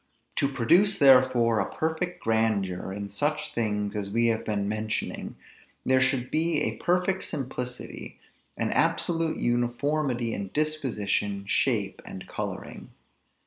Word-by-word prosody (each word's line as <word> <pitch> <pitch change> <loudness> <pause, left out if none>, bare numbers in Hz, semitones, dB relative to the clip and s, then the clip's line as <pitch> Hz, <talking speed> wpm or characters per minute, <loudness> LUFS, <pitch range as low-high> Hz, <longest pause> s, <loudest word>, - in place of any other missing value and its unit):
To 140 - +3
produce 170 - +3
therefore 130 -5 +5
a - - -1
perfect 160 +3 -2
grandeur 105 -5 0
in 100 +1 -5
such 145 +9 -1
things 105 -2 -1
as 100 -2 -2
we 115 +3 +2
have 110 -1 0
been 100 -2 -1
mentioning, 110 +1 -3 0.5
there 130 0 +4
should 130 -1 +1
be 160 0 +1
a - - -2
perfect 180 +2 +1
simplicity, 125 -4 -6 0.4
an - - -1
absolute 165 -2 +1
uniformity 120 0 0
in 100 -1 -4
disposition, 110 -10 -1
shape, - - 0
and - - -9
coloring. - - -6
120 Hz, 125 wpm, -27 LUFS, 110-150 Hz, 0.5 s, therefore